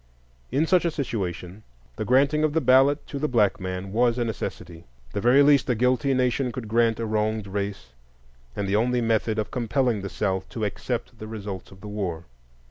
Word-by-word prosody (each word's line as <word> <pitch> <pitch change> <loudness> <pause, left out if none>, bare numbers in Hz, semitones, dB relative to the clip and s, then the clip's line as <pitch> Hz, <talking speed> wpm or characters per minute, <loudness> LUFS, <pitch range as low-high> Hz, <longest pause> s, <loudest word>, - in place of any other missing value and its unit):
In 140 +6 +2
such 180 +1 +3
a 170 - +2
situation, 100 - -4 0.3
the 110 - -3
granting 140 +6 +3
of 155 -1 +1
the 160 - +3
ballot 135 +1 +4
to 140 - -6
the 150 - 0
black 110 -7 +2
man 95 +1 -5
was 120 +2 +2
a 120 - 0
necessity, 85 -6 -6 0.3
the 100 - -2
very 125 +5 +6
least 140 -1 +4
a 125 - +3
guilty 125 +3 +2
nation 125 0 +1
could 115 -1 -6
grant 115 +1 +2
a 115 - -1
wronged 110 -1 -1
race, 100 -7 -4 0.7
and 100 - -2
the 100 - +1
only 125 +3 +2
method 110 -1 +1
of 110 - -2
compelling 120 -2 0
the 100 - -5
South 95 -2 -2
to 110 -2 -3
accept 115 +3 -4
the 110 - -7
results 105 -3 -6
of 95 0 -16
the 105 - -8
war. 95 -6 -4
115 Hz, 200 wpm, -25 LUFS, 100-130 Hz, 0.7 s, very